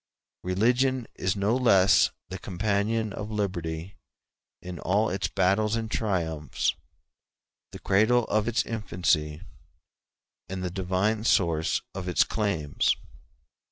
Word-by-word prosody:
Religion 120 +7 +1
is 95 +1 -1
no 100 +4 +1
less 100 -7 +5 0.2
the - - -6
companion 105 +3 -1
of 105 +1 -6
liberty 90 -4 -3 0.6
in 90 -2 -8
all 100 +6 +1
its 95 +1 -1
battles 100 +4 +1
and 110 -1 -3
its - - 0
triumphs; 80 - -1 1.0
the - - -8
cradle 110 +5 +3
of 110 0 0
its 120 0 +1
infancy, 85 -8 -1 1.1
and 95 0 -4
the 90 - -2
divine 95 +4 0
source 85 -8 +2
of 95 -1 -5
its 90 - +4
claims. 85 -10 0
100 Hz, 120 wpm, -27 LUFS, 90-110 Hz, 1.1 s, less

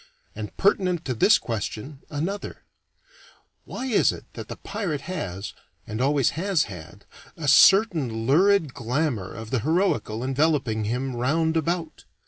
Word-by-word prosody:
And 105 -1 -7
pertinent 185 -3 +1
to 130 - -1
this 200 - +5
question 115 +5 -5
another 170 +8 -4 1.0
Why 260 - -6
is 240 -6 +3
it - - -9
that - - -8
the - - -6
pirate 195 -8 -4
has, 110 - -5 0.3
and 110 +3 -4
always 140 -1 +2
has 185 +1 +1
had, 90 0 -11 0.3
a 155 -3 -4
certain 145 - +5
lurid 165 +1 +3
glamour 120 - -2
of 110 -1 -9
the 130 - +1
heroical 130 - 0
enveloping 130 -5 +1
him 125 +4 -2
round 160 +7 +1
about? 165 0 -2
145 Hz, 135 wpm, -25 LUFS, 115-170 Hz, 1.0 s, this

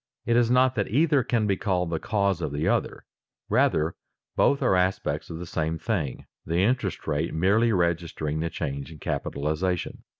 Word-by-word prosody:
It 115 - +2
is 120 -1 +4
not 125 +1 +4
that 100 -5 -1
either 145 +3 +3
can 120 -3 0
be 100 -2 +2
called 90 -3 -1
the 80 - -1
cause 100 -3 0
of 75 - -2
the 75 +3 -1
other; - - -1 0.4
rather 80 +2 +2 0.4
both 140 - +3
are - - +3
aspects 90 +1 0
of 80 - -5
the 90 - -6
same 80 -1 -2
thing, 80 - -3 0.2
the 85 +1 -2
interest 105 -6 0
rate 80 +2 -1
merely 105 +8 +3
registering 85 -4 -1
the 85 +1 -1
change 70 -1 -4
in 80 - -10
capitalization. 80 +6 -2
90 Hz, 175 wpm, -26 LUFS, 80-110 Hz, 0.4 s, is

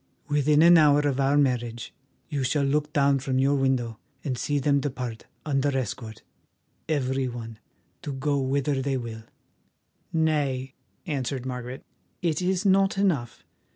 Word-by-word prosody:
Within 150 +1 +3
an 170 0 +8
hour 145 -1 +5
of 140 -2 0
our 135 +1 +3
marriage 120 -4 0 0.3
you 145 -3 -2
shall 140 +3 +1
look 150 +2 0
down 140 -1 +3
from 130 0 -1
your 135 +2 +3
window 130 -5 0 0.2
and 135 -3 -2
see 145 +4 -1
them 140 0 +2
depart 125 -5 -5 0.2
under 140 -2 +1
escort, 110 -2 -5 0.7
every 135 -3 0
one, 115 -2 -7 0.4
to 145 - -5
go 140 +1 0
whither 135 +1 0
they 135 0 -1
will." 115 -2 -6 0.9
"Nay," 145 -5 0 0.3
answered 135 -5 -3
Margaret, 125 0 -6 0.4
"it 165 -1 0
is 185 +1 0
not 195 0 +3
enough. 165 - 0
135 Hz, 145 wpm, -26 LUFS, 130-150 Hz, 0.9 s, an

